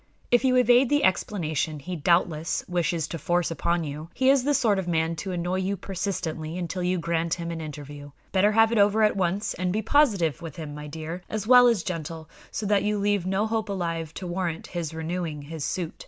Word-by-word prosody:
"If 245 +1 +4
you 255 -1 +3
evade 250 0 +5
the 290 0 +2
explanation 160 -5 0
he 175 +6 -6
doubtless 165 0 +1
wishes 170 -3 0
to 165 - -5
force 175 +2 0
upon 170 +2 0
you, 150 +2 -6
he 265 0 +4
is 275 -2 +3
the 290 0 +3
sort 215 -6 +2
of 185 - -4
man 165 -1 0
to 190 +4 -4
annoy 180 +1 -1
you 190 +1 -1
persistently 175 -4 -4
until 180 +1 -3
you 180 +1 +1
grant 170 0 -1
him 170 -1 -5
an 165 -1 -5
interview. 145 -1 -8 0.2
Better 205 +2 +3
have 225 +1 +5
it 230 - +2
over 205 +2 +4
at 210 - +3
once; 190 +2 0
and 180 0 -2
be 215 +3 -1
positive 200 - +2
with 165 -4 -7
him, 155 -3 -7
my 150 0 -7
dear, 160 +4 -6
as 215 -1 -3
well 245 +1 +8
as 230 -7 +2
gentle, 165 -3 -5 0.2
so 215 - -4
that 205 -1 +3
you 210 0 0
leave 200 -2 0
no 195 +3 +1
hope 220 -1 -2
alive 165 -5 -3
to 190 - -6
warrant 175 -2 -3
his 170 -4 -4
renewing 160 -2 -4
his 155 +1 -6
suit." 175 0 -2
175 Hz, 215 wpm, -26 LUFS, 160-205 Hz, 0.2 s, well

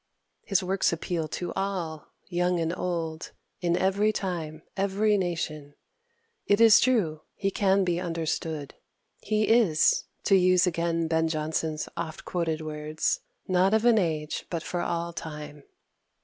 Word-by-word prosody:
His 195 -1 +1
works 190 +1 +1
appeal 170 -1 -2
to 175 +3 -4
all, 175 -6 -3 0.2
young 180 0 0
and 165 +1 -1
old, 165 -3 -3 0.3
in 175 -1 +1
every 200 +3 +2
time, 165 -6 -4
every 200 +2 +2
nation. 160 -6 -3 0.7
It 205 +1 +4
is 225 -2 +8
true; 195 -12 +1
he 195 -1 -1
can 195 -1 +3
be 175 -2 0
understood. 160 -3 -3 0.5
He 215 -1 +1
is, 220 -10 +4 0.2
to 195 - +4
use 185 0 +5
again 170 -1 0
Ben 160 0 +1
Jonson's 155 0 -2
oft 160 -2 -5
quoted 165 -3 -1
words, 155 0 -2 0.3
"Not 185 +2 +3
of 220 +1 +1
an 235 -2 +6
age, 155 -4 -2
but 170 -2 -3
for 175 - -3
all 170 0 -2
time." 150 -3 -8
170 Hz, 140 wpm, -27 LUFS, 160-195 Hz, 0.7 s, is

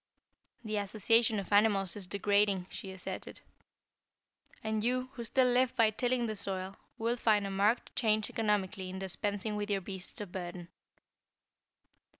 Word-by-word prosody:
"The 215 -1 -2
association 215 +2 +3
of 195 +1 -4
animals 200 -3 +3
is 200 -3 -4
degrading," 200 0 +2
she 195 - -7
asserted. 190 -1 -7 1.2
"And 220 -1 -1
you, 255 +2 0
who 240 - -6
still 255 +3 +3
live 250 0 +3
by 225 -2 +4
tilling 245 +2 0
the 215 -1 -3
soil, 190 -1 -4 0.2
will 235 +1 0
find 215 -3 +3
a 195 - -3
marked 205 +5 +1
change 215 -2 +2
economically 205 -3 -1
in 185 - -6
dispensing 205 +3 -1
with 210 0 -3
your 200 -1 +1
beasts 190 0 -5
of 205 -4 -6
burden. 175 -1 -6
210 Hz, 150 wpm, -32 LUFS, 195-225 Hz, 1.2 s, by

